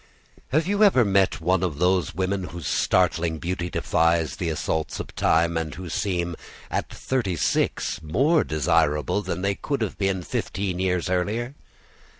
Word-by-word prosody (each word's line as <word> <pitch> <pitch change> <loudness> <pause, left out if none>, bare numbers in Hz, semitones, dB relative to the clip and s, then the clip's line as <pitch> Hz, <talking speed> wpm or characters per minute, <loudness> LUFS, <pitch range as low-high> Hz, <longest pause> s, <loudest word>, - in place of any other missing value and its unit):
Have 155 +4 +1
you 205 +3 +2
ever 130 - +5
met 100 -1 +2
one 90 +2 +2
of 85 -6 -1
those 90 +1 +1
women 95 +1 -1
whose 85 -3 -8
startling 85 -1 +1
beauty 90 +2 -3
defies 85 -4 +1
the 85 - -2
assaults 80 0 -2
of - - -7
time, 85 +1 +2
and 80 -2 -3
who 90 0 -7
seem 85 0 -1 0.4
at - - -2
thirty 120 -9 -2
six 80 0 0
more 135 - +2
desirable 80 +3 +1
than 90 -2 -4
they 100 0 +2
could 140 +6 -3
have 105 - -5
been 95 -2 0
fifteen 95 +1 -3
years 90 -1 0
earlier? 105 +8 -1
90 Hz, 155 wpm, -24 LUFS, 85-100 Hz, 0.4 s, ever